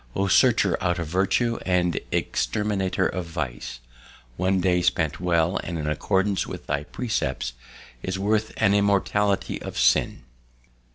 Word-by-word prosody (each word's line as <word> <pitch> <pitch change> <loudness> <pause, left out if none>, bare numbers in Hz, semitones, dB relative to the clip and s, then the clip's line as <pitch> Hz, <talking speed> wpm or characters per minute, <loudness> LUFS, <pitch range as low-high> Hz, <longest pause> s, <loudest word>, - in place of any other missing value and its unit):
O 100 - +1
searcher 95 - +4
out 90 +1 +1
of 85 - -2
virtue 95 +8 +1
and 90 -2 +1
exterminator 100 -3 0
of 90 -2 -2
vice! 65 -7 -5 0.5
One 95 +1 +1
day 90 -1 +2
spent 85 -4 0
well 85 0 +1
and 85 - -4
in 75 - -3
accordance 95 +5 0
with - - -7
thy 70 +1 -2
precepts 70 - -2 0.5
is 95 +5 -3
worth 105 +2 0
an 100 - +3
immortality 100 0 +1
of - - -7
sin." - - +2
95 Hz, 135 wpm, -24 LUFS, 85-100 Hz, 0.5 s, searcher